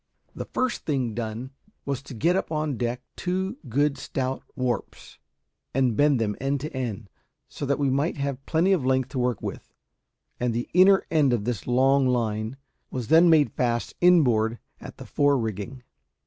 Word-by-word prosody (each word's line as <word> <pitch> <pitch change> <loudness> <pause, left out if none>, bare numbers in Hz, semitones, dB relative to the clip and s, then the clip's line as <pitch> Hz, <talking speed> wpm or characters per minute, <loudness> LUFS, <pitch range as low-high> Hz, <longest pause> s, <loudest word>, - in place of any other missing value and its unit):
The - - -6
first 255 -2 -1
thing 130 -7 0
done 115 +3 -5 0.3
was 140 -2 -2
to 140 -2 -10
get 165 +10 +2
up 190 - -2
on 155 -3 -1
deck 120 +1 -3
two 190 +6 -2
good 140 +3 +1
stout 130 0 -3
warps, 125 -1 -4 0.6
and 130 -4 +2
bend 145 0 +3
them 105 -2 -1
end 135 +1 0
to 150 -1 -6
end, 115 -5 -4 0.4
so 140 - -6
that 140 - +1
we 140 -2 +1
might 145 +6 0
have 140 -1 -3
plenty 170 +4 +2
of 175 -8 +1
length 130 0 +1
to 130 - -4
work 125 -3 -1
with; - - -7 0.6
and 125 -2 0
the 120 - -2
inner 190 +2 +6
end 150 -6 +3
of 115 -4 0
this 120 -6 -3
long 135 +2 +3
line 115 -1 -1 0.3
was 125 -4 -5
then 165 +2 +7
made 155 -3 +4
fast 120 -2 -1
inboard 120 -11 +4 0.2
at - - -10
the - - -9
fore 145 -1 +2
rigging. 115 +3 -4
130 Hz, 175 wpm, -25 LUFS, 120-150 Hz, 0.6 s, then